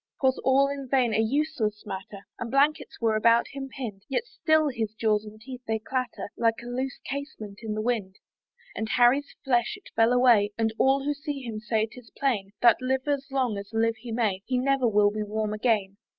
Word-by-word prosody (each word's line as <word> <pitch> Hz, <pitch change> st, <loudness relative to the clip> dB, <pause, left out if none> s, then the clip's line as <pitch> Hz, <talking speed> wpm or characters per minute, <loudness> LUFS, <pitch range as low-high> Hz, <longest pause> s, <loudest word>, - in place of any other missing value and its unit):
'Twas 260 Hz, -1 st, +2 dB
all 270 Hz, +1 st, +4 dB
in 275 Hz, -1 st, -5 dB
vain, 250 Hz, -4 st, +2 dB
a 215 Hz, -, +2 dB
useless 225 Hz, -3 st, 0 dB
matter, 195 Hz, 0 st, -7 dB, 0.2 s
And 240 Hz, -, -4 dB
blankets 280 Hz, +4 st, +1 dB
were 225 Hz, -2 st, +2 dB
about 230 Hz, +2 st, +4 dB
him 275 Hz, -1 st, -6 dB
pinn'd; 225 Hz, -8 st, -6 dB
Yet 460 Hz, -, -1 dB
still 315 Hz, -8 st, +2 dB
his 220 Hz, -4 st, -3 dB
jaws 215 Hz, -1 st, +1 dB
and 215 Hz, 0 st, -11 dB
teeth 255 Hz, +2 st, -9 dB
they 220 Hz, 0 st, +1 dB
clatter, 250 Hz, 0 st, -4 dB
Like 230 Hz, -1 st, +1 dB
a -, -, -10 dB
loose 255 Hz, +2 st, -3 dB
casement 270 Hz, -8 st, -6 dB
in 220 Hz, -2 st, -3 dB
the 215 Hz, -, -2 dB
wind. 215 Hz, -6 st, -1 dB, 0.6 s
And 220 Hz, 0 st, -3 dB
Harry's 250 Hz, +5 st, +3 dB
flesh 240 Hz, -, +1 dB
it 400 Hz, -, -17 dB
fell 225 Hz, +1 st, +4 dB
away; 235 Hz, -5 st, +4 dB
And 225 Hz, -1 st, +1 dB
all 270 Hz, +1 st, +3 dB
who 290 Hz, +1 st, 0 dB
see 290 Hz, -1 st, -5 dB
him 225 Hz, -3 st, -5 dB
say 215 Hz, 0 st, 0 dB
'tis 230 Hz, +1 st, -14 dB
plain, 225 Hz, -8 st, 0 dB
That, 235 Hz, +1 st, +6 dB
live 260 Hz, +2 st, -1 dB
as 280 Hz, -2 st, 0 dB
long 255 Hz, -6 st, 0 dB
as 200 Hz, +2 st, -10 dB
live 225 Hz, 0 st, +1 dB
he 240 Hz, -2 st, -8 dB
may, 215 Hz, -5 st, 0 dB
He 255 Hz, -, +1 dB
never 270 Hz, 0 st, +2 dB
will 205 Hz, -2 st, +4 dB
be 215 Hz, +1 st, -3 dB
warm 210 Hz, 0 st, -2 dB
again. 210 Hz, -3 st, 0 dB
235 Hz, 210 wpm, -27 LUFS, 215-270 Hz, 0.6 s, That